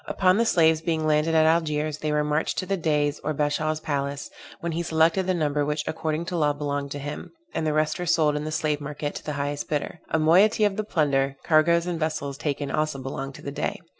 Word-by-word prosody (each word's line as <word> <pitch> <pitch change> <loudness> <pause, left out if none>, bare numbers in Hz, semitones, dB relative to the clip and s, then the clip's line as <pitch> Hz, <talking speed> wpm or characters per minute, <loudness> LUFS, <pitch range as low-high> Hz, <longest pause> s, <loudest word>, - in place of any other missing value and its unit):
Upon 185 0 +3
the 230 0 +2
slaves 160 -4 +4
being 160 -2 -1
landed 155 +1 +2
at 160 0 +5
Algiers 155 -2 +1
they 155 - -1
were 150 0 +2
marched 150 +1 -1
to - - -1
the 195 +1 0
Dey's 150 -4 0
or 155 0 -3
Bashaw's 155 +2 0
palace, 140 -2 -3 0.3
when 170 - -3
he 165 +1 -2
selected 165 +3 +2
the 185 - +2
number 150 -3 0
which 150 +1 -1
according 160 +1 -2
to 175 - -4
law 150 -3 +2
belonged 145 -1 -3
to - - -5
him; 145 +1 -7 0.2
and 155 - -1
the 155 - +1
rest 155 +1 +1
were 180 - -3
sold 155 -3 +3
in 150 - -2
the 155 - -4
slave 155 -1 -1
market 145 0 -4
to - - -7
the 150 - -4
highest 145 0 -3
bidder. 150 +3 -2
A - - +1
moiety 185 +8 +4
of 205 -2 +2
the 215 - -1
plunder, 140 -8 +1
cargoes 170 +2 +4
and 175 -2 -3
vessels 155 -3 -2
taken 145 -1 -2
also 155 -2 0
belonged 135 +1 -5
to - - -11
the 140 - -4
Dey. 145 - -3
155 Hz, 235 wpm, -25 LUFS, 145-165 Hz, 0.3 s, at